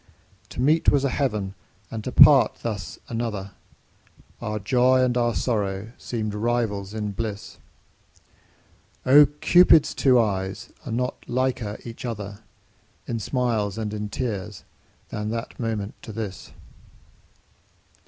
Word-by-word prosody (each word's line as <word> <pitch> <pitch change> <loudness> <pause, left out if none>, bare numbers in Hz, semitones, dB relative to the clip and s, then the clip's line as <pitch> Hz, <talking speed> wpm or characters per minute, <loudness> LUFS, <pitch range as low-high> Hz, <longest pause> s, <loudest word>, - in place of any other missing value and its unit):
To - - -9
meet 155 +6 +4
was 140 -2 +3
a 140 - +2
heaven 105 -9 -1 0.4
and 110 -1 -5
to 130 - -3
part 135 -5 +7
thus 105 -4 -4
another, 110 -4 -4 0.9
Our 105 0 -3
joy 125 +5 +3
and 125 -1 +1
our 120 -1 +1
sorrow 105 -2 -1
seemed 110 -3 -3
rivals 105 -2 -1
in 105 -1 -3
bliss; 105 0 -5 1.5
Oh! 145 +3 +8
Cupid's 175 -3 +6
two 130 -3 +4
eyes 95 -3 -2 0.2
are - - -4
not 125 +2 -3
liker 120 -4 -1
each 115 -1 -8
other 105 -4 -5 0.7
In 115 - -3
smiles 110 -4 -1
and 110 -2 -3
in 105 -1 -4
tears 105 -4 -4 0.5
than 105 0 -4
that 115 +1 -5
moment 110 -3 -3
to 110 - -9
this. 105 -3 -6
115 Hz, 125 wpm, -24 LUFS, 105-125 Hz, 1.5 s, Oh